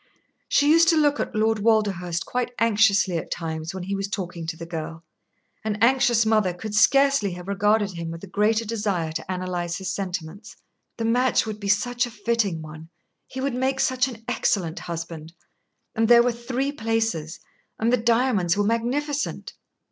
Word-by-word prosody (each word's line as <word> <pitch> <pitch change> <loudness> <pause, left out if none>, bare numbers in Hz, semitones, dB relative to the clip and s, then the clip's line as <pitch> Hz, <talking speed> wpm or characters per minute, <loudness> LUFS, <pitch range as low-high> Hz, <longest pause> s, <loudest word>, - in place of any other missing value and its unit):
She 290 +1 +4
used 330 +1 +6
to 325 -1 +4
look 295 -1 +3
at - - -3
Lord 220 0 +2
Walderhurst 200 -6 +1
quite 245 0 -3
anxiously 205 -5 +3
at - - -9
times 160 -1 -4
when 190 -1 -6
he 195 +2 -4
was 195 0 -2
talking 175 -5 -5
to 165 0 -4
the 170 - -7
girl. 165 0 -6 0.6
An 215 -1 -1
anxious 240 -1 +4
mother 215 -5 +2
could 215 +3 -7
scarcely 275 -2 +4
have 180 +1 -9
regarded 205 +1 +1
him 170 -2 -6
with 165 +2 -8
a - - -7
greater 215 +4 +1
desire 205 -7 -2
to 155 - -5
analyse 180 -2 -3
his 190 -1 -4
sentiments. 185 +1 -6 0.4
The 230 - -2
match 245 +2 +2
would 215 -1 -5
be 200 -1 -4
such 240 +4 +1
a - - -8
fitting 210 -6 -1
one. 155 +1 -11 0.4
He 260 - -6
would 275 -1 -1
make 265 +2 -1
such 255 -1 +2
an 230 -4 -9
excellent 190 -8 0
husband 165 -1 -7 0.6
and 225 -1 +1
there 235 0 +7
were 245 - +2
three 250 +4 -3
places, 225 - -2 0.4
and 230 +2 +1
the - - +5
diamonds 225 -6 +2
were 205 - +2
magnificent. 265 +7 -2
210 Hz, 180 wpm, -24 LUFS, 180-240 Hz, 0.6 s, there